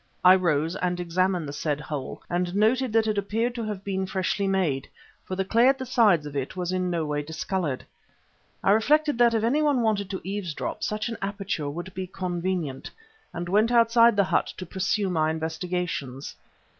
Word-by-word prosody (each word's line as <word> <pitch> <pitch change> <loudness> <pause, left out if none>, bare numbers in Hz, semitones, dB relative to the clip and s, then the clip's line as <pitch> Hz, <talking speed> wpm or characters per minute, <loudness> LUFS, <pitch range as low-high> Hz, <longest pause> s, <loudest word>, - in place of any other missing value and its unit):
I 180 - +10
rose 165 -2 +1
and 180 -1 -1
examined 180 -1 0
the 140 - -6
said 150 0 -2
hole, 140 -2 -6
and 175 +1 -1
noted 235 +4 +2
that 225 -1 +4
it 215 -2 +1
appeared 225 +4 -1
to 235 -1 -4
have 205 -3 -5
been 190 -1 -2
freshly 190 +1 -1
made, 175 -9 0 0.4
for 185 - -4
the 190 0 -1
clay 230 +5 +4
at 270 0 +4
the 260 - -5
sides 215 - +3
of 145 -1 -7
it 135 +3 -3
was 180 0 -2
in 185 -1 0
no 170 -2 -1
way 150 -1 -1
discoloured. 160 -1 -3 0.8
I 195 - +4
reflected 295 +6 +3
that 235 -1 +5
if 220 - +1
anyone 285 +1 +2
wanted 205 -3 0
to 190 - -4
eavesdrop, 190 -5 -4
such 215 +2 -1
an 230 - -5
aperture 195 -6 -3
would 175 +5 -6
be 185 0 -4
convenient, 175 -6 -3 0.4
and 175 +1 -5
went 210 +5 +3
outside 230 -1 +5
the 200 - +4
hut - - +1
to 185 - -6
pursue 190 +3 -1
my 160 -4 +1
investigations. 160 -4 -3
185 Hz, 190 wpm, -26 LUFS, 165-215 Hz, 0.8 s, I